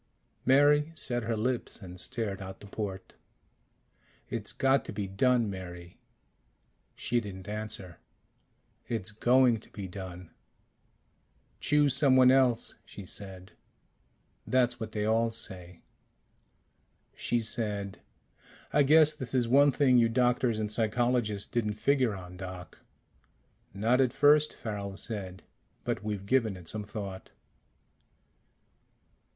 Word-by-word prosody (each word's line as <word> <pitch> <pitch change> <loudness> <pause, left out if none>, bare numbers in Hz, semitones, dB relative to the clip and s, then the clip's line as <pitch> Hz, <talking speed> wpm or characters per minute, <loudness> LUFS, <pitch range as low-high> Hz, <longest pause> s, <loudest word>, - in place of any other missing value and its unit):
Mary 145 +3 +5
set 125 -5 -2
her 115 0 -1
lips 125 +3 -2
and 90 -3 -10
stared 105 -3 -2
out 95 0 -8
the - - -12
port. 100 -2 -6 1.2
"It's - - -3
got 135 +1 +2
to - - -6
be 105 -1 -3
done, 115 +4 +2
Mary." 90 -3 -8 1.0
She 120 0 0
didn't 95 -3 -9
answer. 105 -4 -5 0.9
"It's 110 -4 -3
going 120 +2 +4
to - - -19
be 100 -2 -7
done." 90 -2 -8 1.3
"Choose 145 -3 +3
someone 130 -3 +6
else," 130 -3 +2
she 100 - -11
said. 95 -1 -7 1.0
"That's 125 -1 +2
what 110 -2 -5
they 105 -1 -2
all 115 +1 +2
say." 90 -6 -7 1.3
She 120 -1 0
said, 105 -3 -2 0.7
"I 150 - +5
guess 155 +2 +6
this 130 -4 -5
is 125 -2 +2
one 140 +4 +5
thing 130 -2 +4
you 115 -1 +4
doctors 120 -1 +2
and 105 -1 -2
psychologists 115 -2 0
didn't 110 -3 -1
figure 125 0 +1
on, 90 -1 -10
Doc." 90 -2 -8 0.9
"Not 115 +7 +2
at 125 -3 +2
first," 150 +1 +5
Farrel 100 -3 -5
said. 95 -5 -5 0.4
"But 95 - -2
we've 105 -2 -4
given 110 -4 +1
it 90 -2 -13
some 105 +3 -3
thought." 100 -3 -7
110 Hz, 125 wpm, -29 LUFS, 100-125 Hz, 1.3 s, someone